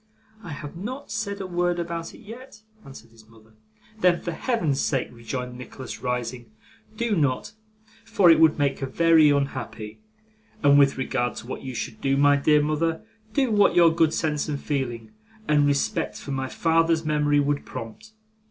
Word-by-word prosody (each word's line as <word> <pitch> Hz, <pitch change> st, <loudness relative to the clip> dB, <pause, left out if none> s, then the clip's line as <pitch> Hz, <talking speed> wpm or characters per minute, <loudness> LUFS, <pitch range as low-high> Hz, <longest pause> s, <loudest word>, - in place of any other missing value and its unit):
'I 175 Hz, -, -9 dB
have 145 Hz, +1 st, -8 dB
not 255 Hz, +10 st, -7 dB
said 200 Hz, -2 st, -3 dB
a 195 Hz, -, -4 dB
word 175 Hz, -1 st, 0 dB
about 170 Hz, -1 st, -5 dB
it -, -, -15 dB
yet,' 230 Hz, 0 st, -12 dB, 0.2 s
answered 115 Hz, -4 st, -13 dB
his 110 Hz, -1 st, -19 dB
mother. 110 Hz, -1 st, -21 dB, 0.5 s
'Then, 180 Hz, -3 st, +3 dB
for 175 Hz, -, -4 dB
Heaven's 165 Hz, -, -1 dB
sake,' 135 Hz, -4 st, -1 dB
rejoined 125 Hz, +1 st, -6 dB
Nicholas, 125 Hz, 0 st, -9 dB
rising, 125 Hz, -1 st, -4 dB, 0.5 s
'do 235 Hz, -2 st, 0 dB
not, 145 Hz, +3 st, 0 dB, 0.5 s
for 180 Hz, -4 st, +4 dB
it 160 Hz, -, +5 dB
would 160 Hz, -1 st, +5 dB
make 140 Hz, -2 st, 0 dB
her 135 Hz, -, -3 dB
very 165 Hz, +1 st, +4 dB
unhappy. 125 Hz, -6 st, -3 dB, 0.6 s
And 145 Hz, 0 st, +6 dB
with 140 Hz, -1 st, +4 dB
regard 125 Hz, -2 st, -1 dB
to -, -, -8 dB
what -, -, -6 dB
you 130 Hz, -2 st, -7 dB
should 110 Hz, -, -5 dB
do, 135 Hz, 0 st, +1 dB
my 145 Hz, 0 st, +5 dB
dear 150 Hz, +1 st, +3 dB
mother, 160 Hz, +2 st, -1 dB, 0.3 s
do 265 Hz, -4 st, +1 dB
what 205 Hz, -4 st, +4 dB
your 170 Hz, -2 st, +6 dB
good 165 Hz, -2 st, +3 dB
sense 150 Hz, -2 st, -1 dB
and 145 Hz, -2 st, -2 dB
feeling, 120 Hz, -7 st, -4 dB, 0.4 s
and 145 Hz, -1 st, +3 dB
respect 140 Hz, -1 st, -1 dB
for 140 Hz, -, -8 dB
my 135 Hz, -1 st, -2 dB
father's 165 Hz, +1 st, +1 dB
memory, 150 Hz, -1 st, +2 dB
would 145 Hz, 0 st, 0 dB
prompt. 215 Hz, -, -9 dB
145 Hz, 175 wpm, -24 LUFS, 130-170 Hz, 0.6 s, And